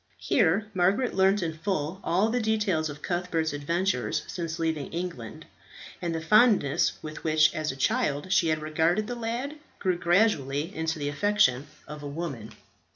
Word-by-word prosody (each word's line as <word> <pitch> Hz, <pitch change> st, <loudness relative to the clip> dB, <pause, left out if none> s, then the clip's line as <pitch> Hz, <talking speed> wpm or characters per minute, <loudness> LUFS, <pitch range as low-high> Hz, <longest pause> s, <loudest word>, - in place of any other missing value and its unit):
Here 200 Hz, -1 st, +2 dB
Margaret 195 Hz, +7 st, +2 dB
learnt 190 Hz, +1 st, +3 dB
in 165 Hz, -1 st, -2 dB
full 165 Hz, +1 st, -3 dB
all 195 Hz, +6 st, +2 dB
the 245 Hz, -, +1 dB
details 210 Hz, -8 st, 0 dB
of 145 Hz, 0 st, -9 dB
Cuthbert's 175 Hz, -3 st, -1 dB
adventures 145 Hz, -, -1 dB
since 165 Hz, -2 st, -5 dB
leaving 160 Hz, -3 st, -2 dB
England, 165 Hz, -10 st, -6 dB, 0.6 s
and 170 Hz, -2 st, -2 dB
the -, -, -1 dB
fondness 210 Hz, -, +4 dB
with 155 Hz, 0 st, -8 dB
which 155 Hz, -1 st, +4 dB
as 155 Hz, -1 st, -2 dB
a -, -, -8 dB
child 145 Hz, +4 st, 0 dB
she 175 Hz, -2 st, +3 dB
had 155 Hz, -1 st, 0 dB
regarded 165 Hz, +6 st, +1 dB
the 245 Hz, -, -4 dB
lad 240 Hz, +5 st, -4 dB, 0.2 s
grew 180 Hz, -2 st, -1 dB
gradually 170 Hz, -4 st, +1 dB
into 160 Hz, 0 st, -2 dB
the 145 Hz, -1 st, -3 dB
affection 145 Hz, -5 st, +2 dB, 0.2 s
of 150 Hz, 0 st, -8 dB
a 145 Hz, -, -6 dB
woman. 140 Hz, -7 st, -5 dB
165 Hz, 160 wpm, -27 LUFS, 150-195 Hz, 0.6 s, fondness